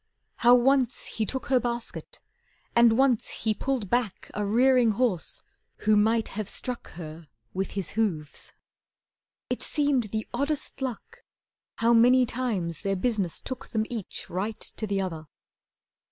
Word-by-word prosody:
How 240 Hz, +1 st, +7 dB
once 255 Hz, 0 st, +2 dB
he 220 Hz, -2 st, -3 dB
took 265 Hz, -, -3 dB
her 260 Hz, -2 st, +3 dB
basket, 235 Hz, -1 st, -4 dB, 0.6 s
and 235 Hz, -1 st, +6 dB
once 260 Hz, -4 st, +3 dB
he 220 Hz, -, +2 dB
Pulled 255 Hz, -1 st, -2 dB
back 240 Hz, -6 st, -1 dB
a 210 Hz, -, -2 dB
rearing 240 Hz, +2 st, +4 dB
horse 215 Hz, -6 st, 0 dB, 0.4 s
who 215 Hz, 0 st, +4 dB
might 220 Hz, +2 st, +3 dB
have 210 Hz, -1 st, -4 dB
struck 250 Hz, -2 st, -4 dB
Her 160 Hz, -1 st, -9 dB, 0.3 s
with 190 Hz, +1 st, -2 dB
his 190 Hz, -5 st, -2 dB
hoofs. 170 Hz, -10 st, -2 dB, 1.0 s
It -, -, -1 dB
seemed 285 Hz, -6 st, +1 dB
the 215 Hz, +1 st, -3 dB
oddest 285 Hz, +3 st, -2 dB
luck 265 Hz, -, -5 dB, 0.5 s
How 230 Hz, +1 st, +3 dB
many 250 Hz, +2 st, +6 dB
times 220 Hz, -10 st, -2 dB
their 195 Hz, -2 st, 0 dB
business 200 Hz, -4 st, 0 dB
took 260 Hz, +1 st, -6 dB
them 220 Hz, -1 st, -1 dB
each 225 Hz, -6 st, -5 dB
Right 205 Hz, +5 st, -3 dB
to 215 Hz, -, -4 dB
the 200 Hz, -1 st, 0 dB
other. 165 Hz, -5 st, -4 dB
225 Hz, 145 wpm, -27 LUFS, 200-250 Hz, 1.0 s, How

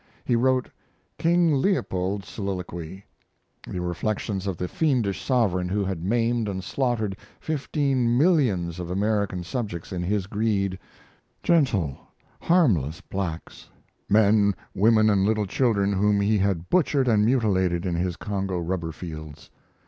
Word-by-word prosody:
He 120 Hz, -, +2 dB
wrote 130 Hz, +1 st, +2 dB, 0.5 s
"King 170 Hz, -1 st, +3 dB
Leopold's 100 Hz, -, -1 dB
Soliloquy," 95 Hz, -2 st, -6 dB, 0.6 s
the 90 Hz, -, -4 dB
reflections 95 Hz, +2 st, -2 dB
of 95 Hz, -3 st, -2 dB
the 90 Hz, -, -3 dB
fiendish 125 Hz, -, 0 dB
sovereign 95 Hz, -9 st, +1 dB
who 100 Hz, +1 st, 0 dB
had 95 Hz, -4 st, -3 dB
maimed 115 Hz, +2 st, +1 dB
and 95 Hz, -1 st, -4 dB
slaughtered 115 Hz, -7 st, -1 dB, 0.2 s
fifteen 135 Hz, -5 st, 0 dB
millions 120 Hz, -, +2 dB
of 90 Hz, -1 st, -5 dB
African 100 Hz, -1 st, 0 dB
subjects 90 Hz, -3 st, -5 dB
in 90 Hz, -2 st, -3 dB
his 95 Hz, +2 st, -1 dB
greed 100 Hz, -2 st, -1 dB, 0.6 s
gentle, 115 Hz, -, +2 dB, 0.4 s
harmless 100 Hz, -, +2 dB
blacks 95 Hz, -4 st, -6 dB, 0.4 s
men, 105 Hz, -1 st, +4 dB, 0.2 s
women, 110 Hz, +2 st, +4 dB
and 100 Hz, -3 st, +3 dB
little 105 Hz, +1 st, +1 dB
children 100 Hz, -2 st, +1 dB
whom 100 Hz, +1 st, +2 dB
he 105 Hz, +1 st, +2 dB
had 95 Hz, -3 st, 0 dB
butchered 145 Hz, -7 st, +2 dB
and 110 Hz, -3 st, +4 dB
mutilated 95 Hz, -7 st, +1 dB
in 90 Hz, -, -1 dB
his 90 Hz, +1 st, -1 dB
Congo 95 Hz, -3 st, -3 dB
rubber 85 Hz, -1 st, -2 dB
fields. 75 Hz, -3 st, -9 dB
100 Hz, 130 wpm, -25 LUFS, 90-115 Hz, 0.6 s, men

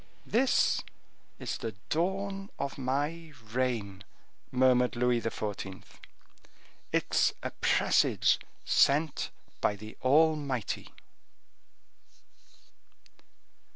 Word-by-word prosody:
"This 250 Hz, +3 st, +3 dB, 0.6 s
is -, -, -4 dB
the 115 Hz, -, -4 dB, 0.2 s
dawn 195 Hz, +4 st, -1 dB
of 140 Hz, 0 st, -4 dB
my 145 Hz, +5 st, -2 dB, 0.2 s
reign," 115 Hz, -7 st, -1 dB, 0.5 s
murmured 125 Hz, -1 st, +3 dB
Louis 120 Hz, 0 st, +2 dB
XIV. 100 Hz, -4 st, -4 dB, 1.1 s
"It's -, -, +2 dB
a -, -, -3 dB
presage -, -, +3 dB, 0.3 s
sent 150 Hz, +2 st, +3 dB, 0.3 s
by 105 Hz, -, +2 dB
the 110 Hz, +2 st, -10 dB
Almighty." 140 Hz, -4 st, +2 dB
130 Hz, 75 wpm, -30 LUFS, 115-160 Hz, 1.1 s, This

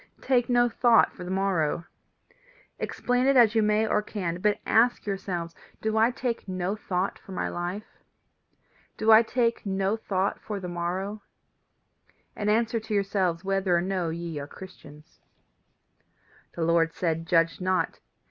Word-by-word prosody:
Take 245 Hz, -2 st, +1 dB
no 240 Hz, 0 st, +4 dB
thought 235 Hz, 0 st, +4 dB
for 180 Hz, -, -9 dB
the 180 Hz, -, -7 dB
morrow. 185 Hz, -4 st, 0 dB, 0.9 s
Explain 250 Hz, +1 st, 0 dB
it 275 Hz, -1 st, +4 dB
as 230 Hz, -3 st, +6 dB
you 225 Hz, -, +3 dB
may 210 Hz, +1 st, +2 dB
or 210 Hz, -1 st, +1 dB
can 180 Hz, -5 st, -4 dB
but 210 Hz, 0 st, +2 dB
ask 240 Hz, +2 st, +3 dB
yourselves 185 Hz, -4 st, -4 dB, 0.3 s
Do 220 Hz, 0 st, -1 dB
I 220 Hz, +2 st, +4 dB
take 245 Hz, -4 st, -3 dB
no 185 Hz, +1 st, -2 dB
thought 190 Hz, -2 st, -2 dB
for 190 Hz, -, -11 dB
my -, -, -2 dB
life? 175 Hz, +4 st, -6 dB, 1.0 s
Do 220 Hz, +1 st, +3 dB
I 220 Hz, +1 st, +9 dB
take 235 Hz, 0 st, 0 dB
no 195 Hz, +1 st, 0 dB
thought 195 Hz, -3 st, -2 dB
for 210 Hz, -2 st, -5 dB
the 185 Hz, -, -6 dB
morrow? 180 Hz, +4 st, -3 dB, 1.1 s
and 210 Hz, 0 st, -1 dB
answer 230 Hz, +1 st, +2 dB
to 220 Hz, 0 st, -6 dB
yourselves 195 Hz, -4 st, 0 dB
whether 195 Hz, -2 st, +1 dB
or -, -, +1 dB
no 185 Hz, -3 st, -1 dB
ye 165 Hz, -1 st, -5 dB
are 140 Hz, -, -6 dB
Christians. 155 Hz, -4 st, -14 dB, 1.4 s
"The 170 Hz, -, -2 dB
Lord 165 Hz, 0 st, +2 dB
says: 165 Hz, -3 st, 0 dB
Judge 165 Hz, 0 st, +1 dB
not. 185 Hz, 0 st, 0 dB
195 Hz, 155 wpm, -27 LUFS, 175-220 Hz, 1.4 s, I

